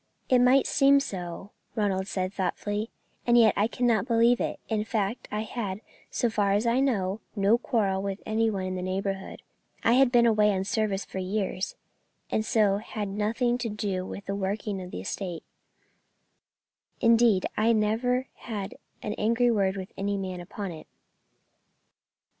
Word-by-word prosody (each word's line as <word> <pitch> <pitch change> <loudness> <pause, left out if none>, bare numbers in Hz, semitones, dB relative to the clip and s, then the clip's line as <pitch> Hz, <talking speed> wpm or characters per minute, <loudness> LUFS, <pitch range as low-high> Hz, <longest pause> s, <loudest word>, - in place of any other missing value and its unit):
"It 255 - +5
might 255 +2 +5
seem 280 -2 +5
so," 190 -5 -6 0.2
Ronald 195 -3 0
said, 185 -1 -2
thoughtfully, 205 +3 -2 0.4
"and 240 0 +5
yet 225 -3 +6
I 210 - +2
cannot 235 -2 +1
believe 235 0 +4
it; - - -2
in 215 -2 0
fact, 215 0 -2
I 210 - -1
had, 210 -3 -4 0.3
so 240 - 0
far 205 -3 +1
as 205 +3 +1
I 235 +2 +3
know, 210 -7 0 0.2
no 205 +3 +3
quarrel 200 -6 0
with 195 0 -3
any 225 +1 +1
one 195 -3 -2
in 185 - -3
the 185 - -3
neighbourhood. 190 +1 -3 0.4
I 230 - +4
had 260 0 +5
been 240 -1 +5
away 210 -2 +4
on 190 0 -1
service 205 0 -1
for 190 - -6
years, 190 0 -2 0.6
and 215 - +1
so 210 -3 +3
had 210 -1 -5
nothing 225 +5 0
to 235 - -2
do 200 -3 -2
with 195 +1 -7
the 195 - -3
working 200 0 -2
of 180 - -7
the 90 - -6
estate, 175 - -5 1.6
indeed 230 -4 +4
I 220 +2 +3
never 230 +4 +1
had 205 -4 -5 0.3
an 210 - -2
angry 235 +3 +3
word 200 -3 +1
with 190 -1 -6
any 200 +1 -1
man 185 -2 -4
upon 195 +1 -6
it." 160 -2 -10
210 Hz, 165 wpm, -27 LUFS, 195-230 Hz, 1.6 s, yet